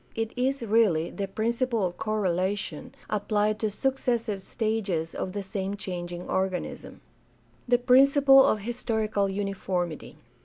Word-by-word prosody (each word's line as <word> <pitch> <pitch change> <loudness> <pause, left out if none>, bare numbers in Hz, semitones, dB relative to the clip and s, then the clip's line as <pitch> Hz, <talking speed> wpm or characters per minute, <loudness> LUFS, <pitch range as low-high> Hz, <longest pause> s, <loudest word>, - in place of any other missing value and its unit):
It 225 0 -2
is 260 +1 0
really 205 -7 +2
the 200 -1 -4
principle 230 +1 0
of 175 -1 -3
correlation 190 -4 -2
applied 210 +1 0
to 220 - 0
successive 235 -3 -1
stages 195 -7 -2
of 185 - -4
the 200 -1 -3
same 195 +1 -4
changing 175 -2 -5
organism. 190 -1 -3 0.7
The 245 0 +4
principle 270 +2 +6
of 215 -6 +2
historical 220 -3 -1
uniformity. 190 -4 -3
210 Hz, 120 wpm, -27 LUFS, 190-235 Hz, 0.7 s, principle